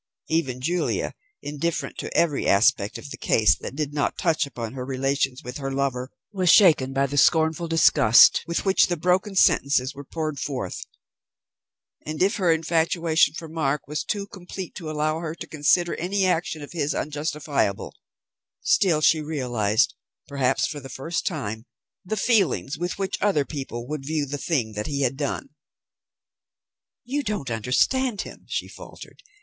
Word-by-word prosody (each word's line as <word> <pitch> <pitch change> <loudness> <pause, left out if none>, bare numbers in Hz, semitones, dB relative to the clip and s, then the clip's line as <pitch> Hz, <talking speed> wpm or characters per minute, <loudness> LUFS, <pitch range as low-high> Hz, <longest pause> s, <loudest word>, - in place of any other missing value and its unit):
Even 135 -6 -1
Julia, 175 +6 -1 0.3
indifferent 150 0 -3
to - - -4
every 155 -5 +2
aspect 100 0 +3
of 140 - -10
the - - -8
case 110 -2 +3
that - - -7
did 145 -1 -3
not 145 -1 -1
touch 160 -4 +1
upon 115 -4 -6
her 130 -1 -5
relations 135 0 -1
with 125 +3 -6
her 135 -1 -4
lover, 135 -2 -2 0.2
was 185 -4 +1
shaken 155 -10 +5
by 135 +1 +1
the 140 +1 0
scornful 160 +2 +3
disgust 135 -7 +6
with 170 +3 -2
which 190 0 +4
the 175 - -2
broken 185 +5 +1
sentences 140 -7 +3
were 140 - -9
poured 155 -1 -4
forth; 125 -10 -4 1.2
and, 155 +3 -2
if 200 +5 +2
her 180 -5 +3
infatuation 165 -1 +2
for 165 - -7
Mark 150 -4 -2
was 150 +1 -3
too 200 -1 -3
complete 185 -2 -8
to 165 -4 -7
allow 155 +1 -1
her 165 -1 -5
to - - -7
consider 170 +3 +2
any 190 +3 0
action 165 -4 -1
of 145 - -10
his 150 -3 -1
unjustifiable, 150 +1 -2 0.7
still 190 - +3
she 155 0 +4
realized, 120 -9 0 0.3
perhaps 135 -2 +1
for 145 - -4
the 135 -1 -10
first 165 +7 -3
time, 115 - -4 0.4
the 215 +4 -3
feelings 190 - +1
with 175 +3 -3
which 195 -1 -3
other 185 -9 +2
people 135 -6 -6
would 150 -1 -4
view 150 +1 -1
the 145 +1 -5
thing 130 -8 -1
that 105 0 -4
he 140 -1 -2
had 135 -1 +1
done. 145 - -3 1.5
"You 275 +5 -2
don't 205 - -3
understand 200 - +1
him," - - -11
she - - -2
faltered. - - -12
150 Hz, 165 wpm, -24 LUFS, 135-170 Hz, 1.5 s, disgust